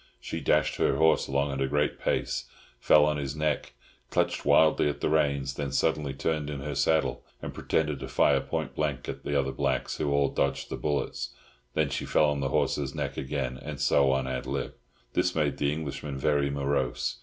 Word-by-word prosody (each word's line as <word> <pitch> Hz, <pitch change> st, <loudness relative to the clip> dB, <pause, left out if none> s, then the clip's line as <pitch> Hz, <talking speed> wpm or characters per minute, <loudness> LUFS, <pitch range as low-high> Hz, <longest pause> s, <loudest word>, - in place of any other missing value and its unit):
She -, -, -5 dB
dashed -, -, +2 dB
her -, -, +2 dB
horse 80 Hz, 0 st, +3 dB
along 70 Hz, +1 st, 0 dB
at 70 Hz, 0 st, -3 dB
a 70 Hz, -, +2 dB
great 75 Hz, +2 st, 0 dB
pace, -, -, -1 dB, 0.3 s
fell 75 Hz, +3 st, +6 dB
on 75 Hz, 0 st, +1 dB
his 70 Hz, -1 st, -3 dB
neck, 75 Hz, -5 st, -1 dB, 0.4 s
clutched -, -, 0 dB
wildly 80 Hz, -2 st, +5 dB
at 75 Hz, -, -4 dB
the -, -, 0 dB
reins, 70 Hz, -3 st, +1 dB
then 70 Hz, -1 st, -3 dB
suddenly 75 Hz, 0 st, +1 dB
turned 75 Hz, +1 st, -1 dB
in 70 Hz, -2 st, -4 dB
her 75 Hz, +1 st, -4 dB
saddle, 75 Hz, +3 st, +1 dB, 0.2 s
and -, -, -6 dB
pretended 75 Hz, -3 st, 0 dB
to 65 Hz, -, -6 dB
fire 65 Hz, -, +3 dB
point -, -, -3 dB
blank 75 Hz, -4 st, -2 dB
at -, -, -5 dB
the 75 Hz, -, 0 dB
other 65 Hz, 0 st, 0 dB
blacks, 65 Hz, -2 st, -1 dB
who 75 Hz, -, -1 dB
all 70 Hz, -1 st, +3 dB
dodged 70 Hz, -, -1 dB
the -, -, -3 dB
bullet. 70 Hz, -4 st, -2 dB, 0.5 s
Then 75 Hz, -2 st, +2 dB
she -, -, -2 dB
fell 75 Hz, -1 st, +3 dB
on 70 Hz, -, -2 dB
the 70 Hz, -1 st, -1 dB
horse's 70 Hz, +1 st, 0 dB
neck 70 Hz, -2 st, -3 dB
again, 65 Hz, -2 st, -3 dB
and 75 Hz, -2 st, -6 dB
so 70 Hz, -1 st, +4 dB
on 65 Hz, -1 st, 0 dB
ad 65 Hz, -1 st, -3 dB
lib. -, -, -3 dB, 0.4 s
This 90 Hz, -, +1 dB
made 75 Hz, -3 st, +1 dB
the 70 Hz, 0 st, +1 dB
Englishman 75 Hz, -2 st, -4 dB
very 70 Hz, 0 st, +1 dB
morose. 70 Hz, -3 st, -1 dB
70 Hz, 200 wpm, -28 LUFS, 70-75 Hz, 0.5 s, fell